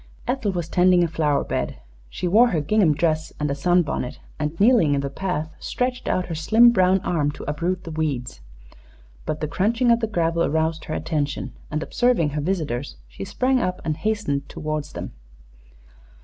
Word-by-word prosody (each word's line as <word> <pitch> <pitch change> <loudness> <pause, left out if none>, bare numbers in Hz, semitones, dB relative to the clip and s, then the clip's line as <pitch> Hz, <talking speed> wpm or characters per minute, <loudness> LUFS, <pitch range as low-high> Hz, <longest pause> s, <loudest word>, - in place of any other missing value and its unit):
Ethel 250 -5 0
was 175 -3 -3
tending 180 0 +4
a - - +2
flower 150 -3 +1
bed. - - -3 0.3
She 180 - -3
wore 220 +7 +6
her 175 -9 0
gingham 165 0 +3
dress 155 0 0
and 150 -1 0
a - - +1
sunbonnet, 165 -3 0 0.2
and, 150 +2 -3
kneeling 205 - +5
in 140 - 0
the 140 0 -4
path, 160 -2 -3
stretched 250 0 -2
out 185 - +1
her 170 - -5
slim 220 +10 +5
brown 185 -3 +3
arm 160 -7 0
to - - -9
uproot 170 +5 -2
the 165 - -7
weeds. 140 - -3 0.9
But 155 - -2
the 155 - -1
crunching 225 - +2
of 235 - +4
the 225 - -1
gravel 170 -4 0
aroused 160 +1 0
her 155 - -4
attention, 150 -3 -2 0.2
and, 155 +1 -2
observing 240 -10 +2
her 150 +1 -2
visitors, 145 -7 -2
she - - -8
sprang 255 - +1
up 180 -5 -1
and 155 -2 0
hastened 155 -9 -2
toward 155 -1 -3
them. - - -7
165 Hz, 180 wpm, -23 LUFS, 150-195 Hz, 0.9 s, wore